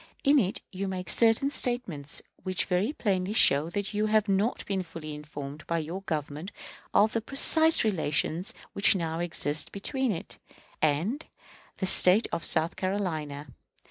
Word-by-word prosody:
In 285 Hz, 0 st, +5 dB
it 195 Hz, -5 st, -1 dB
you 195 Hz, +1 st, -4 dB
make 185 Hz, -4 st, -2 dB
certain 230 Hz, +4 st, +3 dB
statements 195 Hz, -, 0 dB, 0.2 s
which 185 Hz, -1 st, -2 dB
very 190 Hz, +7 st, 0 dB
plainly 195 Hz, -7 st, -2 dB
show 150 Hz, -6 st, +5 dB
that 200 Hz, +3 st, -4 dB
you 210 Hz, +1 st, 0 dB
have 215 Hz, 0 st, +2 dB
not 200 Hz, +4 st, 0 dB
been 195 Hz, -2 st, -2 dB
fully 165 Hz, -3 st, -8 dB
informed 150 Hz, 0 st, -8 dB
by 170 Hz, -, -1 dB
your 165 Hz, +4 st, -5 dB
Government 155 Hz, 0 st, -5 dB, 0.4 s
of 215 Hz, +2 st, +3 dB
the 230 Hz, -, -1 dB
precise 315 Hz, +6 st, +4 dB
relations 170 Hz, -3 st, 0 dB, 0.2 s
which 200 Hz, -, +4 dB
now 165 Hz, -2 st, -3 dB
exist 160 Hz, -3 st, -1 dB
between 255 Hz, +5 st, -2 dB
it 165 Hz, -, -6 dB, 0.4 s
and 165 Hz, -, 0 dB, 0.5 s
the 190 Hz, -, -2 dB
State 190 Hz, +3 st, +6 dB
of 165 Hz, -, -3 dB
South 160 Hz, +3 st, +1 dB
Carolina. 160 Hz, -7 st, -3 dB
185 Hz, 150 wpm, -27 LUFS, 155-215 Hz, 0.5 s, State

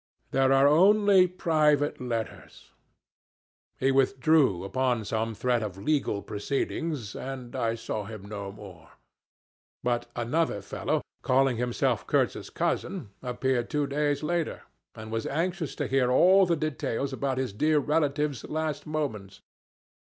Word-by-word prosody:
'There 135 Hz, 0 st, +3 dB
are 135 Hz, +1 st, +6 dB
only 195 Hz, +4 st, +5 dB
private 155 Hz, -5 st, +1 dB
letters.' 115 Hz, -5 st, -5 dB, 1.1 s
He 135 Hz, +1 st, +2 dB
withdrew 135 Hz, -, +3 dB
upon 125 Hz, +2 st, 0 dB
some 110 Hz, +1 st, -2 dB
threat 120 Hz, +1 st, +1 dB
of 100 Hz, -4 st, -5 dB
legal 120 Hz, -3 st, 0 dB
proceedings, 135 Hz, +2 st, -3 dB
and 130 Hz, -2 st, -7 dB
I 115 Hz, 0 st, 0 dB
saw 110 Hz, -2 st, -4 dB
him 110 Hz, -2 st, -8 dB
no 100 Hz, -1 st, -6 dB
more; 100 Hz, -5 st, -13 dB, 0.9 s
but 120 Hz, -1 st, 0 dB
another 125 Hz, +1 st, 0 dB
fellow, -, -, -2 dB, 0.2 s
calling 130 Hz, -1 st, +2 dB
himself 120 Hz, 0 st, 0 dB
Kurtz's -, -, 0 dB
cousin, 175 Hz, -, -2 dB
appeared 125 Hz, -1 st, -1 dB
two 150 Hz, -1 st, 0 dB
days 145 Hz, +1 st, -1 dB
later, 170 Hz, +1 st, -2 dB, 0.3 s
and 110 Hz, 0 st, -9 dB
was 115 Hz, 0 st, -2 dB
anxious 170 Hz, +1 st, -2 dB
to -, -, -2 dB
hear 130 Hz, -2 st, +2 dB
all 185 Hz, +8 st, +5 dB
the 170 Hz, -1 st, +1 dB
details 140 Hz, -3 st, -2 dB
about 135 Hz, -1 st, -2 dB
his 130 Hz, -6 st, -2 dB
dear 155 Hz, +9 st, +2 dB
relative's 145 Hz, -2 st, 0 dB
last 155 Hz, -1 st, -3 dB
moments. 135 Hz, -11 st, -4 dB
135 Hz, 130 wpm, -27 LUFS, 115-155 Hz, 1.1 s, are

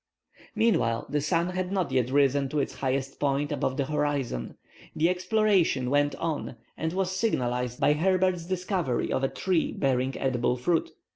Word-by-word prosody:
Meanwhile 210 Hz, -, +2 dB
the 150 Hz, 0 st, 0 dB
sun 170 Hz, +3 st, +1 dB
had 185 Hz, 0 st, -3 dB
not 190 Hz, -3 st, -1 dB
yet 125 Hz, -2 st, +1 dB
risen 140 Hz, 0 st, +2 dB
to 150 Hz, -, -3 dB
its 140 Hz, -, -1 dB
highest 135 Hz, +1 st, -2 dB
point 145 Hz, 0 st, 0 dB
above 130 Hz, -, -1 dB
the 140 Hz, -, 0 dB
horizon. 145 Hz, -, -2 dB, 0.4 s
The 165 Hz, +2 st, +3 dB
exploration 185 Hz, -, +2 dB
went 145 Hz, 0 st, +2 dB
on 155 Hz, -5 st, -3 dB, 0.2 s
and 160 Hz, 0 st, -2 dB
was 185 Hz, +1 st, -1 dB
signalized 125 Hz, -, -1 dB
by 145 Hz, -, +4 dB
Herbert's 185 Hz, +1 st, +1 dB
discovery 180 Hz, -, -1 dB
of 130 Hz, -, -1 dB
a 135 Hz, -, +2 dB
tree 185 Hz, -4 st, 0 dB
bearing 130 Hz, -1 st, 0 dB
edible 125 Hz, -1 st, 0 dB
fruit. 165 Hz, +7 st, 0 dB
145 Hz, 160 wpm, -27 LUFS, 130-180 Hz, 0.4 s, by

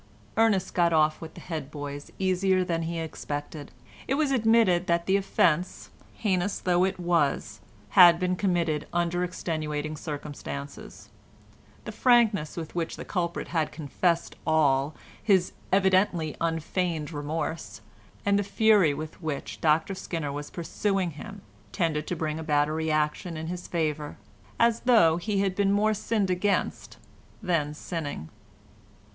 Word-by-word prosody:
Ernest 210 Hz, -5 st, +2 dB
got 170 Hz, -2 st, +3 dB
off 155 Hz, -1 st, +3 dB
with 160 Hz, -, -9 dB
the -, -, -10 dB
head 155 Hz, -5 st, -5 dB
boys 145 Hz, -1 st, -7 dB
easier 185 Hz, 0 st, +2 dB
than 170 Hz, -2 st, -1 dB
he 165 Hz, +1 st, -3 dB
expected. 145 Hz, -2 st, -5 dB, 0.4 s
It 270 Hz, -, +1 dB
was 295 Hz, -1 st, +1 dB
admitted 225 Hz, -7 st, +3 dB
that 170 Hz, 0 st, +1 dB
the 190 Hz, -, +2 dB
offence, 180 Hz, -3 st, +1 dB, 0.2 s
heinous 195 Hz, -2 st, 0 dB
though 180 Hz, 0 st, +2 dB
it 190 Hz, -, -2 dB
was, 170 Hz, -5 st, 0 dB, 0.3 s
had 175 Hz, -2 st, +8 dB
been 180 Hz, 0 st, 0 dB
committed 170 Hz, -5 st, 0 dB
under 175 Hz, +1 st, 0 dB
extenuating 155 Hz, -4 st, -3 dB
circumstances; 145 Hz, -1 st, -7 dB, 0.8 s
the -, -, -5 dB
frankness 225 Hz, -11 st, +3 dB
with 160 Hz, -2 st, -6 dB
which 170 Hz, -2 st, -2 dB
the -, -, -8 dB
culprit 170 Hz, -3 st, -2 dB
had 160 Hz, -3 st, 0 dB
confessed 165 Hz, +3 st, -1 dB
all, 145 Hz, -2 st, +2 dB, 0.3 s
his 190 Hz, -4 st, +3 dB, 0.2 s
evidently 185 Hz, -4 st, +2 dB
unfeigned 165 Hz, -1 st, -1 dB
remorse, 155 Hz, +2 st, -4 dB, 0.4 s
and 200 Hz, 0 st, +3 dB
the -, -, +1 dB
fury 200 Hz, -6 st, +4 dB
with 155 Hz, +3 st, -7 dB
which 155 Hz, -4 st, -5 dB
Dr 160 Hz, +4 st, +2 dB
Skinner 165 Hz, -5 st, -4 dB
was 145 Hz, +1 st, -6 dB
pursuing 185 Hz, +1 st, -1 dB
him 200 Hz, +6 st, -10 dB, 0.3 s
tended 155 Hz, -5 st, -1 dB
to 180 Hz, -, -2 dB
bring 155 Hz, -1 st, -3 dB
about 150 Hz, -2 st, +2 dB
a -, -, -3 dB
reaction 160 Hz, +2 st, -1 dB
in 160 Hz, -, -5 dB
his 175 Hz, +2 st, -5 dB
favour, 155 Hz, -3 st, -2 dB, 0.4 s
as 235 Hz, 0 st, +4 dB
though 170 Hz, -10 st, +5 dB
he 200 Hz, +2 st, -1 dB
had 195 Hz, -2 st, 0 dB
been 200 Hz, 0 st, +2 dB
more 210 Hz, +2 st, +3 dB
sinned 210 Hz, -2 st, 0 dB
against 200 Hz, +3 st, -1 dB, 0.5 s
than 155 Hz, -5 st, 0 dB
sinning. 150 Hz, -, -5 dB
170 Hz, 140 wpm, -27 LUFS, 155-190 Hz, 0.8 s, had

